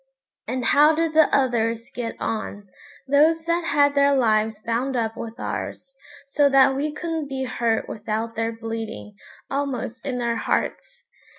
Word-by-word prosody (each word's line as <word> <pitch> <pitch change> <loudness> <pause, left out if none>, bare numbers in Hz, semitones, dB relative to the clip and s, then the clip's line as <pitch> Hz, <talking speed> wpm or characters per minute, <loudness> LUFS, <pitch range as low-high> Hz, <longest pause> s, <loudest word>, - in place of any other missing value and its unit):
And 255 -1 -2
how 300 +2 +5
did 325 0 0
the 315 -1 +5
others 230 -3 0
get 235 -2 -4
on, 205 -2 -4 0.4
those 315 +4 +3
that 340 +1 0
had 285 -2 +3
their 280 0 +4
lives 220 -3 +2
bound 235 +4 -2
up 225 -2 -1
with 230 0 -7
ours, - - -5 0.3
so 285 0 +3
that 270 0 +5
we 295 +3 -1
couldn't 320 -1 -4
be 265 -1 -3
hurt 235 -3 -1
without 220 +1 -3
their 225 0 -1
bleeding, 225 -1 -6 0.4
almost 260 -4 -3
in 255 -3 -3
their 235 -1 -1
hearts? - - -2
255 Hz, 155 wpm, -23 LUFS, 225-285 Hz, 0.4 s, how